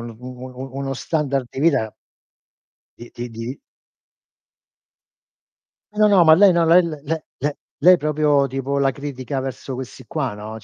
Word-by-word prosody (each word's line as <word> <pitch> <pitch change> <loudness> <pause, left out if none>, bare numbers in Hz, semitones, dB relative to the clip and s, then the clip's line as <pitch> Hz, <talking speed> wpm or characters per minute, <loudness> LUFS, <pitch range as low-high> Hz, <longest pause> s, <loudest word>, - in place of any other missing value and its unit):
un 115 -1 -8
u 125 - -11
u 125 0 -8
u 130 +1 -8
uno 135 0 -3
standard 140 -3 -1
di 135 - -6
vita 110 -10 +1 1.0
di 120 - -10
di 120 +1 -5
di 115 +4 -7 2.3
Eh 210 - -11
no, 215 - +6
no, 200 -4 +5
ma 160 -1 +8
lei 195 +1 +6
no, 170 -1 +2
le 175 +2 +6
le 160 -4 -5
le 160 +1 -3
le 145 +2 -2 0.2
lei 180 +5 +7
proprio 150 -2 +2
tipo 135 +1 -2
la 135 -1 +2
critica 135 -1 -5
verso 130 0 -6
questi 130 0 -8
qua, 135 -8 -3
no 105 +1 -8
140 Hz, 170 wpm, -21 LUFS, 125-155 Hz, 2.3 s, ma